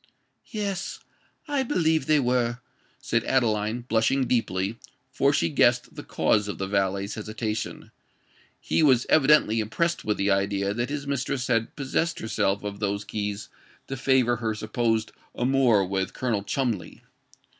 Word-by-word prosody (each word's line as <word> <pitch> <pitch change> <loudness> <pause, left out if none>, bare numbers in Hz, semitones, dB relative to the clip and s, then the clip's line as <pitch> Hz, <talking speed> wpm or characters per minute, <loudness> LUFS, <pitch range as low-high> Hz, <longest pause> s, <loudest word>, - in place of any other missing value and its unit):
"Yes—I 290 -2 0
believe 160 - +1
they 155 -1 +4
were," 120 -2 +1 0.4
said - - 0
Adeline, 110 -2 +1
blushing 120 +3 +1
deeply—for 115 +5 -1
she 110 -12 +1
guessed 75 - +2
the - - -7
cause 105 -1 +1
of 100 - -4
the 95 - -2
valet's 100 +1 -1
hesitation: 110 0 -4 0.7
he - - 0
was 130 -5 +4
evidently 140 -7 +4
impressed 170 +11 -1
with 105 - -1
the 100 +1 +1
idea 100 0 0
that 120 +4 -2
his 145 0 -4
mistress 140 -1 -2
had 115 -3 0
possessed 150 +4 -1
herself 105 -3 -1
of 100 -1 -5
those 100 -1 -1
keys 105 0 -4 0.4
to 135 - -5
favor 125 -2 +2
her 110 -1 -2
supposed 110 0 -1 0.2
amour 125 -5 +3
with 95 0 -2
Colonel 115 -6 -1
Cholmondeley. 115 -4 -3
115 Hz, 135 wpm, -26 LUFS, 105-130 Hz, 0.7 s, they